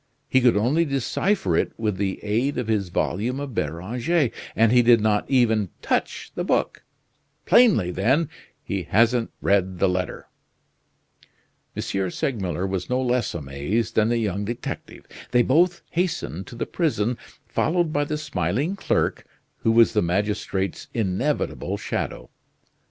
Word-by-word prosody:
He 130 - +3
could 120 -4 +4
only 130 +11 +2
decipher 140 - 0
it - - 0
with 105 -4 -1
the 95 -1 -2
aid 115 +7 0
of 125 -3 -2
his 105 -4 0
volume 110 +9 -1
of 140 -3 -5
Beranger, 115 - 0 0.2
and 115 0 +4
he 125 0 +6
did 120 -1 +6
not 105 -1 +1
even 110 -7 +3
touch - - -1
the - - -3
book; - - 0 0.6
plainly, 195 - +5
then, 130 - +2 0.4
he 100 -1 -2
hasn't 115 +5 +2
read 95 -2 +2
the 95 - +3
letter." 90 -2 -2 1.5
M. - - -3 0.3
Segmuller 95 - -2
was 95 -2 -3
no 125 - +1
less 125 -5 0
amazed 85 +11 -2
than 110 0 +3
the 120 - +2
young 105 -3 -1
detective. 120 +4 -6 0.2
They 125 -1 +4
both 175 +8 +2
hastened 165 - -2
to - - -10
the 115 - -2
prison, 125 - 0 0.3
followed 170 -1 0
by 145 0 +1
the 150 +1 -2
smiling 150 +3 -1
clerk, 195 - -1 0.3
who 115 - +1
was 115 0 +5
the 105 - +3
magistrate's 100 +1 -1
inevitable 115 +7 -1
shadow. - - -4
115 Hz, 145 wpm, -24 LUFS, 95-135 Hz, 1.5 s, he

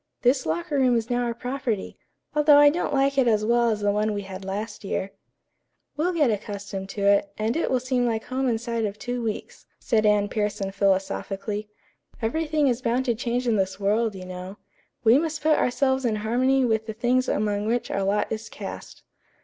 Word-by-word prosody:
This 255 - +3
locker 170 - -1
room 255 -2 +4
is 230 +2 -3
now 245 0 +1
our 235 -1 -1
property, 245 -4 -3 0.4
although 300 -1 +6
I 290 0 +7
don't 345 0 -2
like 275 0 +2
it 255 - +3
as 215 -2 +2
well 235 +1 +3
as 215 -2 -1
the 205 0 +2
one 210 +1 0
we 205 - -3
had 190 0 -8
last 205 +4 -5
year." 195 0 -3 0.8
"We'll 330 +5 0
get 300 -8 +2
accustomed 200 -2 -5
to 200 -1 -3
it, 200 0 +3
and 220 +3 -1
it 330 - 0
will 255 - +2
seem 250 -1 0
like 225 -1 -1
home 260 0 -1
inside 230 -1 -1
of 205 0 -4
two 245 +1 -4
weeks," 220 -2 -5
said 220 -3 +1
Anne 205 -1 +3
Pierson 205 -2 -2
philosophically. 195 +1 -1 0.5
"Everything 300 +5 0
is 250 -1 0
bound 250 +1 0
to 240 - +2
change 245 +1 -2
in 225 -2 +2
this 190 0 -1
world, 210 +2 +1
you 185 -1 -8
know. 185 +2 -8 0.5
'We 235 +4 +6
must 315 -1 -3
put 310 -1 +4
ourselves 265 +1 +1
in 230 -3 +1
harmony 250 +5 +2
with 220 -1 0
the 220 - -4
things 250 +3 +1
among 210 0 0
which 235 +1 -1
our 195 - -1
lot 200 +2 0
is 220 0 -4
cast.'" - - -8
225 Hz, 200 wpm, -25 LUFS, 205-255 Hz, 0.8 s, I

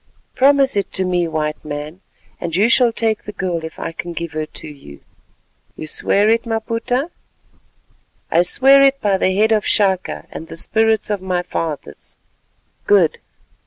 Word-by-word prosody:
Promise 275 -1 +4
it 200 - -1
to 190 - +1
me, 175 -1 0
White 155 -1 -3
Man, 150 +4 -7 0.4
and 170 -2 -4
you 205 +5 +3
shall 245 -2 +4
take 225 -1 -1
the 210 - -6
girl 180 -5 -3
if 160 - -8
I - - -4
can 170 +1 -7
give 170 -1 -5
her 155 0 -3
to - - -9
you." 135 - -13 0.7
"You - - -7
swear 200 +6 +2
it, 230 +1 +3
Maputa?" 230 +6 -2 1.2
"I 170 - +4
swear 270 +9 +5
it 275 0 +4
by 200 -2 +1
the 190 0 +1
head 215 +3 +3
of 215 -1 +2
Chaka, 190 -3 0
and 160 - -8
the 165 - -9
spirits 220 +3 +2
of 205 -2 -2
my 180 -1 -2
fathers." 155 - -5 0.7
"Good. 190 -6 +3
190 Hz, 165 wpm, -18 LUFS, 165-225 Hz, 1.2 s, swear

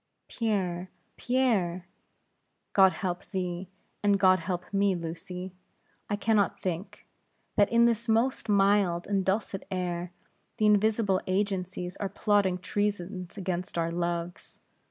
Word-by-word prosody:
"Pierre! 190 -6 -1 0.3
Pierre!" 215 -9 +1 0.9
"God 190 -1 +7
help 180 -3 -3
thee, 180 -1 -4 0.3
and 205 -1 +3
God 185 -1 +5
help 180 -2 -3
me, 200 -1 +3
Lucy. 180 +2 -6 0.6
I 205 - +1
can 220 +2 +1
not 200 -2 +2
think, 190 +3 -4 0.5
that 205 -1 +4
in 235 0 +5
this 230 0 +1
most 230 +1 +1
mild 195 -3 +3
and 195 -2 0
dulcet 195 0 -1
air, 180 -1 -3 0.5
the 215 - +2
invisible 210 -1 +3
agencies 185 -2 -2
are 200 - -2
plotting 200 -2 +2
treasons 195 -1 -3
against 180 -2 -3
our 165 0 0
loves. 170 +1 -4
190 Hz, 125 wpm, -28 LUFS, 180-205 Hz, 0.9 s, God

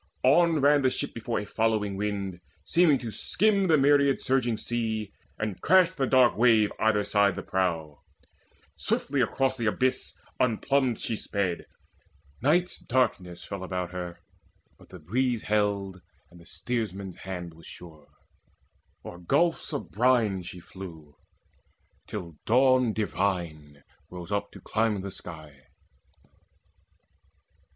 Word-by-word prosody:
On 165 +4 +4
ran 145 +1 +5
the 130 - +3
ship - - -4
before 115 0 -3
a 105 - -5
following 110 -2 0
wind, 100 -2 -3 0.3
Seeming 165 -4 +4
to 120 -3 -6
skim 200 - +1
the 160 -3 +5
myriad 140 -1 +4
surging 125 -4 +1
sea, 110 -4 -3 0.2
And 105 -3 -4
crashed 185 -1 +4
the 135 - +1
dark 130 -2 +5
wave 110 -2 +4
either 110 -2 +2
side 100 -1 +2
the - - -5
prow: 80 -6 -2 0.7
Swiftly 140 -1 0
across 130 +3 0
the 115 -3 -1
abyss 130 +4 0 0.2
unplumbed 125 +1 +1
she 115 - -2
sped. 100 -5 -2 0.8
Night's 175 +7 +2
darkness 100 -9 -1
fell 100 -2 -6
about 90 -1 -3
her, 90 -1 -6 0.6
but - - -18
the 95 - -10
breeze 120 +8 -1
Held, 100 -3 -1 0.3
and 90 - -15
the 85 - -17
steersman's 100 -6 -4
hand 90 -3 -6
was 80 0 -15
sure. 80 -4 -12 1.0
O'er 85 - -8
gulfs 165 - +1
Of 145 - -5
brine 115 -4 +2
she 90 0 -9
flew, 80 -5 -11 0.9
till 85 -7 -7
Dawn 130 0 +4
divine 85 -8 -3 0.3
rose 90 +1 -9
up 100 0 -1
To - - -12
climb 110 -2 0
the 100 0 -6
sky. 80 -7 -9
105 Hz, 130 wpm, -27 LUFS, 90-130 Hz, 1.0 s, ran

